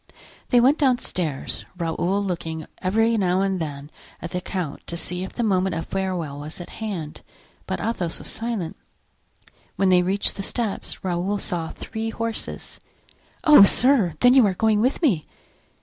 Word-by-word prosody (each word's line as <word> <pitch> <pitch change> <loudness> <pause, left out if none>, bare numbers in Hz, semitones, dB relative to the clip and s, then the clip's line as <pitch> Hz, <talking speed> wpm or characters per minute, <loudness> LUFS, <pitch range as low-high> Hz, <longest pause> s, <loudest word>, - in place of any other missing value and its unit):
They 245 - +4
went 265 +5 +4
downstairs, 185 - -1
Raoul 175 +4 0
looking 165 -4 -4
every 225 +5 +2
now 185 -2 +2
and 195 -1 0
then 145 -1 -6 0.3
at 170 - -7
the 180 - -2
count 180 -6 -5
to 170 - -4
see 180 +2 -3
if 190 - -7
the 240 - -2
moment 190 -4 +1
of 165 0 -3
farewell 180 -7 -3
was 150 +4 -7
at 175 - -9
hand, 180 -9 -5 0.5
but - - -2
Athos 185 -7 -2
was - - -9
silent. 225 -7 -4 1.0
When 195 -1 +2
they 180 -1 +5
reached 190 +3 +1
the - - -3
steps 220 +1 -3
Raoul 185 +2 -1
saw 170 -4 -2
three 225 0 -5
horses. 230 0 -5 0.6
"Oh, 305 - +8
sir! 210 - +5
then 245 0 +7
you 265 -2 +7
are 190 - -1
going 215 +1 +2
with 260 +8 0
me?" 190 - +2
190 Hz, 165 wpm, -23 LUFS, 170-225 Hz, 1.0 s, Oh